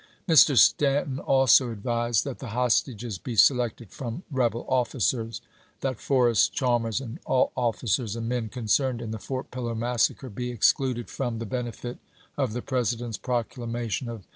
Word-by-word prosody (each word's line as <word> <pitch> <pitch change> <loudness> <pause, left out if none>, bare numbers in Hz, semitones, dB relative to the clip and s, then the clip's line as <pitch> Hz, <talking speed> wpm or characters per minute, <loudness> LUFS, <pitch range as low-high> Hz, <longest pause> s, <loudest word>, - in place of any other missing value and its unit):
Mr. 155 -5 +6
Stanton 140 +3 +3
also 135 -3 +4
advised 120 0 0
that 135 -3 -6
the 130 - -7
hostages 120 -4 0
be 120 +2 -5
selected 120 -1 +3
from 130 +6 -6
rebel 120 -3 0
officers; 120 -2 0 0.4
that 130 -4 -2
Forrest, 120 -6 +3
Chalmers, 120 -3 +1
and 125 -4 -8
all 130 - +2
officers 115 -2 -1
and 115 -1 -4
men 120 -2 -2
concerned 125 +2 0
in 115 -2 -5
the 110 - -5
Fort 130 +4 -5
Pillow 120 -2 -4
massacre 120 +2 0
be 125 +4 -4
excluded 120 +1 +1
from 120 -4 -3
the 115 - -4
benefit 120 +1 -5 0.4
of 130 -6 -1
the 125 - -4
President's 120 -3 -2
proclamation 120 -1 -3
of 115 -3 -7
Vol. - - -29
120 Hz, 155 wpm, -26 LUFS, 115-130 Hz, 0.4 s, Mr